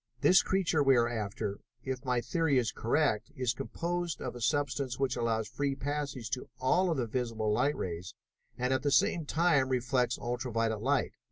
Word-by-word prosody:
This 185 Hz, -, +6 dB
creature 185 Hz, -5 st, +1 dB
we 135 Hz, -2 st, +5 dB
are 120 Hz, 0 st, +3 dB
after, 105 Hz, -3 st, -3 dB, 0.2 s
if 130 Hz, 0 st, -4 dB
my 125 Hz, -2 st, +1 dB
theory 145 Hz, +3 st, +1 dB
is 120 Hz, -3 st, +1 dB
correct, 115 Hz, -2 st, 0 dB
is 125 Hz, -1 st, 0 dB
composed 170 Hz, +4 st, -3 dB
of 125 Hz, -, -5 dB
a 120 Hz, -, -8 dB
substance 140 Hz, 0 st, 0 dB
which 135 Hz, -2 st, 0 dB
allows 110 Hz, -2 st, 0 dB
free 140 Hz, -1 st, -2 dB
passage 140 Hz, -4 st, -4 dB
to 130 Hz, -, -3 dB
all 175 Hz, +8 st, +2 dB
of 165 Hz, -, 0 dB
the 125 Hz, -, 0 dB
visible 115 Hz, -2 st, -1 dB
light 145 Hz, +7 st, +2 dB
rays 85 Hz, -1 st, -5 dB, 0.4 s
and 125 Hz, +1 st, 0 dB
at 130 Hz, -, +1 dB
the 145 Hz, -, +1 dB
same 155 Hz, +2 st, +2 dB
time 150 Hz, -5 st, +3 dB
reflects 125 Hz, -1 st, +1 dB
ultra 120 Hz, +1 st, -3 dB
violet 115 Hz, -1 st, 0 dB
light. 140 Hz, +3 st, +1 dB
130 Hz, 185 wpm, -31 LUFS, 115-145 Hz, 0.4 s, This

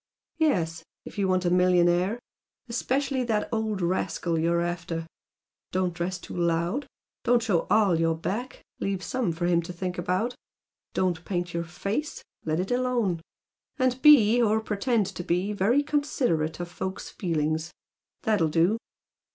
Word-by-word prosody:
"Yes 170 Hz, -, +1 dB, 0.2 s
if -, -, -8 dB
you 195 Hz, -, +2 dB
want 185 Hz, -1 st, +1 dB
a 175 Hz, -, +2 dB
millionaire. 180 Hz, +2 st, +3 dB, 0.5 s
Especially 260 Hz, +3 st, 0 dB
the 220 Hz, -3 st, 0 dB
old 220 Hz, -4 st, -1 dB
rascal 170 Hz, -1 st, 0 dB
you're 170 Hz, +1 st, +2 dB
after. 170 Hz, -1 st, -3 dB, 0.7 s
Don't 185 Hz, -1 st, 0 dB
dress 175 Hz, +2 st, -2 dB
too -, -, -9 dB
'loud.' 170 Hz, -, 0 dB, 0.4 s
Don't 240 Hz, -1 st, +3 dB
show 190 Hz, -7 st, +1 dB
ALL 205 Hz, -6 st, +4 dB
your 165 Hz, 0 st, +2 dB
back 225 Hz, +10 st, -4 dB, 0.2 s
leave 195 Hz, -1 st, -2 dB
some 255 Hz, -8 st, -1 dB
for 170 Hz, +2 st, -2 dB
him 175 Hz, -1 st, +3 dB
to 170 Hz, -, -7 dB
think 180 Hz, 0 st, -4 dB
about. 185 Hz, +8 st, 0 dB, 0.6 s
Don't 175 Hz, -3 st, 0 dB
paint 175 Hz, -2 st, -3 dB
your 170 Hz, 0 st, -2 dB
face, 200 Hz, -, -3 dB, 0.2 s
let 155 Hz, +1 st, 0 dB
it 185 Hz, +4 st, -2 dB
alone. 245 Hz, -9 st, +1 dB, 0.6 s
And 255 Hz, -1 st, +1 dB
be, 245 Hz, -6 st, +7 dB
or 220 Hz, -1 st, +3 dB
pretend 220 Hz, +1 st, 0 dB
to 190 Hz, -2 st, -6 dB
be, 180 Hz, +5 st, 0 dB
very 225 Hz, +9 st, +3 dB
considerate 245 Hz, -, 0 dB
of 175 Hz, -, -3 dB
folks' 185 Hz, +2 st, -5 dB
feelings. 160 Hz, -2 st, -1 dB, 0.5 s
That'll 205 Hz, -8 st, +2 dB
do!" 175 Hz, +8 st, +2 dB
185 Hz, 150 wpm, -27 LUFS, 170-225 Hz, 0.7 s, be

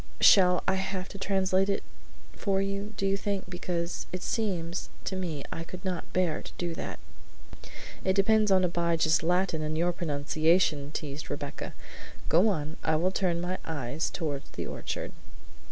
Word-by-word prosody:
Shall 180 Hz, -2 st, +7 dB
I 190 Hz, -, +3 dB
have 190 Hz, -1 st, -3 dB
to 200 Hz, -, -8 dB
translate 190 Hz, 0 st, +2 dB
it 200 Hz, -, 0 dB, 0.5 s
for 195 Hz, -2 st, 0 dB
you, 200 Hz, +2 st, -2 dB
do 195 Hz, -, 0 dB
you 195 Hz, 0 st, +3 dB
think, 200 Hz, -1 st, -2 dB
because 175 Hz, -1 st, -3 dB
it 180 Hz, -, -4 dB
seems 180 Hz, -6 st, -1 dB, 0.2 s
to 190 Hz, -, -2 dB
me 165 Hz, -7 st, -3 dB
I 165 Hz, -, -3 dB
could 185 Hz, +3 st, -9 dB
not 180 Hz, -2 st, -3 dB
bear 180 Hz, -4 st, +1 dB
to -, -, -9 dB
do 175 Hz, -1 st, -2 dB
that!" -, -, -5 dB, 1.1 s
"It 190 Hz, -, +3 dB
depends 210 Hz, +2 st, +4 dB
upon 190 Hz, -1 st, +5 dB
Abijah's 170 Hz, -2 st, +2 dB
Latin 175 Hz, -1 st, +1 dB
and 155 Hz, 0 st, -1 dB
your 175 Hz, +2 st, +3 dB
pronunciation," 155 Hz, -1 st, +2 dB
teased 150 Hz, -1 st, -5 dB
Rebecca. 145 Hz, 0 st, -5 dB, 0.5 s
"Go 180 Hz, +7 st, +6 dB
on; 155 Hz, -6 st, -1 dB
I 160 Hz, -, +2 dB
will 175 Hz, +4 st, +2 dB
turn 180 Hz, -3 st, +1 dB
my 180 Hz, +1 st, -2 dB
eyes 145 Hz, -1 st, -2 dB
toward 145 Hz, -5 st, -2 dB
the -, -, -4 dB
orchard." -, -, -4 dB
180 Hz, 165 wpm, -29 LUFS, 160-190 Hz, 1.1 s, Shall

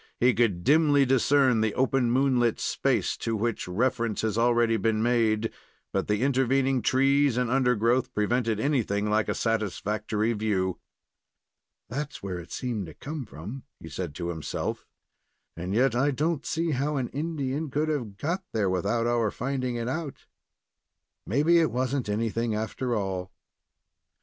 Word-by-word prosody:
He 125 Hz, +1 st, +4 dB
could 100 Hz, -6 st, +1 dB
dimly 145 Hz, -, +4 dB
discern 130 Hz, -2 st, +3 dB
the 110 Hz, -2 st, 0 dB
open 130 Hz, -1 st, +2 dB
moonlit 125 Hz, -2 st, +2 dB
space -, -, 0 dB
to 115 Hz, -, -2 dB
which 115 Hz, -1 st, -2 dB
reference 115 Hz, +3 st, 0 dB
has 110 Hz, -2 st, 0 dB
already 120 Hz, 0 st, +3 dB
been 110 Hz, 0 st, +1 dB
made; 115 Hz, -2 st, +2 dB, 0.4 s
but -, -, 0 dB
the 105 Hz, +3 st, +1 dB
intervening 135 Hz, -1 st, +2 dB
trees 135 Hz, +2 st, +3 dB
and 125 Hz, -2 st, 0 dB
undergrowth 125 Hz, -1 st, +2 dB
prevented 110 Hz, +1 st, +1 dB
anything 105 Hz, -7 st, 0 dB
like 110 Hz, 0 st, +1 dB
a -, -, 0 dB
satisfactory 110 Hz, 0 st, -1 dB
view. 100 Hz, -4 st, -1 dB, 1.1 s
"There's 145 Hz, +5 st, -4 dB
where 95 Hz, -3 st, -4 dB
it 85 Hz, -, -11 dB
seemed 115 Hz, -8 st, -3 dB
to 80 Hz, -, -11 dB
come 150 Hz, -2 st, -6 dB
from," 100 Hz, -, -8 dB, 0.2 s
he 80 Hz, -, -10 dB
said, 75 Hz, 0 st, -5 dB
to 85 Hz, -1 st, -4 dB
himself; 80 Hz, -5 st, -4 dB, 0.7 s
"and 90 Hz, +2 st, -5 dB
yet 125 Hz, +4 st, +3 dB
I 135 Hz, +4 st, +2 dB
do 150 Hz, +4 st, +1 dB
n't 155 Hz, -3 st, -5 dB
see 165 Hz, 0 st, 0 dB
how 145 Hz, +2 st, -1 dB
an 125 Hz, -3 st, -2 dB
Indian 150 Hz, -1 st, -3 dB
could 150 Hz, +3 st, 0 dB
have 120 Hz, -10 st, -3 dB
got 175 Hz, -, -2 dB
there 105 Hz, -4 st, +1 dB
without 115 Hz, +6 st, 0 dB
our 120 Hz, -2 st, +2 dB
finding 130 Hz, +1 st, -2 dB
it 115 Hz, 0 st, -3 dB
out. 150 Hz, +2 st, -4 dB, 1.0 s
Maybe 150 Hz, +9 st, +4 dB
it 160 Hz, -, +3 dB
was 130 Hz, +1 st, -1 dB
n't 125 Hz, -6 st, -2 dB
anything, 115 Hz, +1 st, -1 dB
after 115 Hz, +3 st, -2 dB
all." 95 Hz, -3 st, -3 dB
120 Hz, 155 wpm, -27 LUFS, 105-135 Hz, 1.1 s, He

